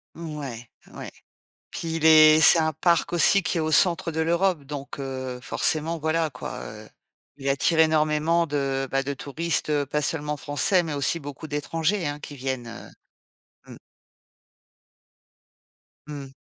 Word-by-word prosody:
Ouais, 145 -8 -7 0.3
ouais. - - -8 0.6
Puis 165 -1 -4
il 160 - -2
est 155 -1 +7
c'est 165 - +7
un 160 0 +1
parc 170 +2 +1
aussi 185 +4 +4
qui 175 - -2
est - - 0
au 155 0 -2
centre 175 0 +2
de 160 - -4
l'Europe. 170 -1 +1
Donc 140 0 -8
heu, 130 -2 -5
forcément, 160 +4 -1
voilà 160 0 0
quoi, 125 - -8
heu, 105 0 -11 0.5
il 135 0 -3
attire 150 +4 +1
énormément 155 +1 +2
de, 135 -2 -2
bah, 135 0 +1
de 140 +1 -3
touristes, 155 +5 -3
heu, 145 -1 +1
pas 150 +1 -1
seulement 150 -1 -2
français, 175 +7 +1
mais 160 -3 -4
aussi 145 +4 0
beaucoup 145 +1 -9
d'étrangers, 160 +5 -2
hein, 145 0 -5
qui 145 0 -9
viennent, 130 -2 -4
heu, 115 - -10 0.8
mmh. - - -12 2.3
Mmh. 140 -3 -8
150 Hz, 155 wpm, -24 LUFS, 140-165 Hz, 2.3 s, est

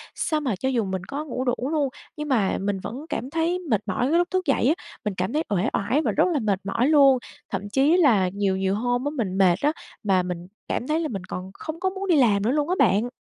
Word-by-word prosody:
sao 310 - 0
mà 255 -8 -1
cho 260 +8 -2
dù 245 -4 +1
mình 190 -1 -3
có 285 +9 -5
ngủ 255 -3 -3
đủ 245 -1 +1 0.2
luôn, 295 -4 +1 0.3
nhưng 300 0 -4
mà 220 -8 +2
mình 200 0 -1
vẫn 255 +10 -7
cảm 255 - -3
thấy 330 +4 0
mệt 265 - 0
mỏi 220 +5 0
cái 330 - +3
lúc 350 0 +2
thức 370 -1 0
dậy 275 -4 +2
á, 295 - +5 0.3
mình 210 - -1
cảm 185 +8 -1
thấy 310 - +1
uể 195 -4 +1
oải 240 +10 +1
và - - 0
rất 315 - +3
là 290 - +1
mệt 205 -5 0
mỏi 235 +7 +1
luôn. 280 -4 +6 0.3
Thậm 200 +1 -4
chí 280 - +3
là 225 - +4
nhiều 200 -2 0
nhiều 190 0 0
hôm 245 +4 -1
á - - +1
mình 190 -6 -1
mệt 185 -3 +5
á 295 - +3 0.3
mà 190 -3 +2
mình 180 -1 -5 0.2
cảm 245 - -2
thấy 310 +1 +1
là 330 - -1
mình 195 -9 -5
còn 185 +1 -6
không 315 +8 -7
có 375 +1 +1
muốn 385 +1 -5
đi 350 - +4
làm 210 -7 +4
nữa 230 - +2
luôn 295 +2 0
á 365 - +2
bạn. 225 -2 +3
245 Hz, 270 wpm, -24 LUFS, 195-300 Hz, 0.3 s, luôn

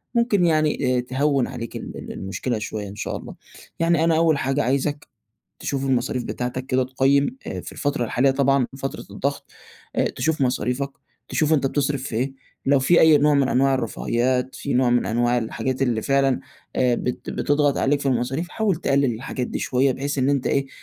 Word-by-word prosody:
ممكن 220 -6 +3
يعني 155 -5 +2
آآ - - +2
تهوِّن 135 +1 +1
عليك 115 0 -7
ال - - -7
ال - - -8
المشكلة 110 +4 -3
شويّة 105 -1 -5
إن 100 - -9
شاء - - -3
الله، - - -10 0.4
يعني 165 -1 +3
أنا 165 -1 +3
أوّل 160 -3 +3
حاجة 135 +1 0
عايزك 140 +3 -1 0.5
تشوف 135 -1 -2
المصاريف 125 -1 0
بتاعتك 125 +2 -4
كده 130 -1 +1
تقيِّم 140 - +2
آآ - - -4
في - - -9
الفترة 145 -4 -1
الحالية 130 +4 +2
طبعًا 135 -2 +2
فترة 135 - -5
الضغط 140 +1 -3 0.4
آآ - - +2
تشوف 155 +3 -1
مصاريفك، 130 +1 0 0.4
تشوف 155 0 +2
أنت 140 -3 +2
بتصرّف 140 -1 -1
في 125 -5 -5
إيه، 130 +3 -1 0.3
لو 140 -1 +5
فيه 170 +6 +4
أي 160 -2 +7
نوع 150 +1 +3
من 140 -2 +3
أنواع 135 +1 +3
الرفاهيات 125 +2 -1
فيه 140 - -3
نوع 125 -1 +3
من 120 0 +2
أنواع 120 +2 +1
الحاجات 120 +3 -2
اللي 120 -4 +1
فعلًا 135 0 +2 0.4
آآ، 125 -1 +3
بت 125 - -4
بتضغط 145 -1 +1
عليك 145 +1 +2
في - - -6
المصاريف 135 +7 -1
حاول 215 -3 0
تقلل 140 -5 +1
الحاجات 125 +1 -4
دي - - -4
شويّة 130 +1 +2
بحيث 140 +2 -3
إن 130 +1 +2
أنت 140 -2 +1
إيه 140 -1 +1
135 Hz, 190 wpm, -23 LUFS, 125-145 Hz, 0.5 s, أي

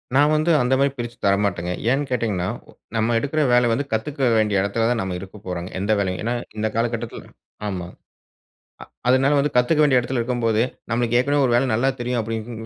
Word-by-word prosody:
நான் 145 +2 +5
வந்து 155 +3 +2
அந்தமாரி 130 +3 +2
பிரிச்சி 120 -1 -5
தரமாட்டங்க. 100 -3 +1 0.2
ஏன்னு 135 +2 +1
கேட்டீங்கன்னா, 105 -7 -1 0.2
ஓ - - -15 0.2
நம்ம 115 +1 +1
எடுக்கிற 145 +5 -1
வேல 120 -1 +4
வந்து 140 +5 -1
கத்துக்க 135 +4 -1
வேண்டிய 105 -2 +2
இடத்தில 105 +3 0
தான் 120 -2 0
நம்ம 95 -1 -3
இருக்கப்போறங்க, 95 -2 -7
எந்த 100 +3 -1
வேலையும். 95 -3 -1
ஏன்னா, 115 +2 -1 0.2
இந்த 110 +1 0
காலகட்டத்தில 115 0 -3 0.4
ஆமா. 90 -4 -4 1.0
அ 125 - -5
அதுனால 135 +3 +4
வந்து 145 +1 +1
கத்துக்க 125 +6 +3
வேண்டிய 135 -4 +4
இடத்தில 125 +1 -2
இருக்கும்போது, 115 -2 0 0.3
நம்மளுக்கு 120 0 +1
ஏற்கனவே 140 +2 +2
ஒரு 120 - +1
வேல 130 +3 +2
நல்லா 125 +5 +2
தெரியும் 120 0 -1
அப்பிடின்னு 115 +1 -5
120 Hz, 180 wpm, -22 LUFS, 105-130 Hz, 1.0 s, நான்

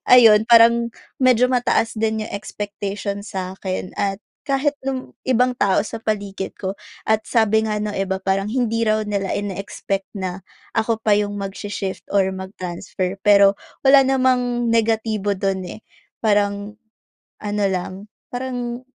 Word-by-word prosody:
ayun, 225 -4 +8
parang 235 0 +6 0.3
medyo 250 -1 +5
mataas 245 -3 +1
din 220 -1 -1
yung - - -10
expectation 200 -1 -4
sa'kin, 185 -1 -5
at 200 -1 -1 0.2
kahit 285 +1 0
nung 265 -1 -4
ibang 250 0 +2
tao 205 -2 +2
sa 225 - -7
paligid 200 -3 -3
ko. 190 0 -3 0.3
At 220 0 +2
sabi 220 -1 +3
nga 210 -1 -1
ng 210 0 -3
iba, 190 -1 -1
parang 195 +1 -1
hindi 230 -2 0
raw 215 -1 +1
nila 200 -2 -2
ine-expect 195 0 -4
na 185 0 -4 0.3
ako 225 0 +1
pa 215 -2 +3
yung 205 0 -1
magsi-shift 195 0 -5
or 200 -1 +3
mag-transfer. 185 -1 -4
Pero, 200 -1 +6 0.3
wala 275 0 +8
namang 255 -2 +1
negatibo 220 -3 +1
dun, 190 -1 -1 0.2
eh. - - -25 0.4
Parang 205 -1 +1 0.7
ano 210 0 -2
lang, 185 0 -3 0.3
parang 245 -1 -4
210 Hz, 135 wpm, -21 LUFS, 195-235 Hz, 0.7 s, ayun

